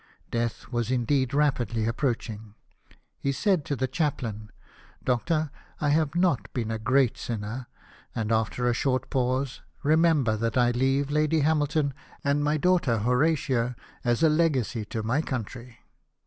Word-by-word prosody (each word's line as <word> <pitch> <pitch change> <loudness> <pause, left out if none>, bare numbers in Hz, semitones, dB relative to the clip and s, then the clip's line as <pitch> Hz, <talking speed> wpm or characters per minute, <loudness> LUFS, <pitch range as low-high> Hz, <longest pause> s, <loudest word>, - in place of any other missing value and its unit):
Death 115 -1 -2
was 120 -2 -1
indeed 130 +1 +1
rapidly 120 -6 +1
approaching. 115 -3 -2 0.6
He 140 - 0
said 185 +3 +1
to 145 - -1
the 130 0 -1
chaplain, 120 -7 -2 0.5
"Doctor, 155 +4 0 0.3
I 150 - +1
have 155 0 +2
not 175 -7 +1
been 115 -3 -1
a 110 - -2
great 125 +2 +2
sinner 115 +2 -4 0.2
"; - - -27
and 110 -1 -1
after 115 +2 +1
a 120 - +3
short 130 +1 -1
pause, 130 +1 0
'' - - -34
Remember 155 -6 +3
that 115 +2 -1
I 120 -1 +4
leave 135 +3 +1
Lady 155 +1 +2
Hamilton 150 -1 +1 0.3
and 145 +1 +1
my 150 +1 +2
daughter 170 -8 +2
Horatia 125 0 +1 0.3
as 120 +3 +1
a 160 - +6
legacy 135 -9 +1
to 110 +1 -4
my 125 +7 +1
country." 125 -3 -6
130 Hz, 150 wpm, -27 LUFS, 115-150 Hz, 0.6 s, a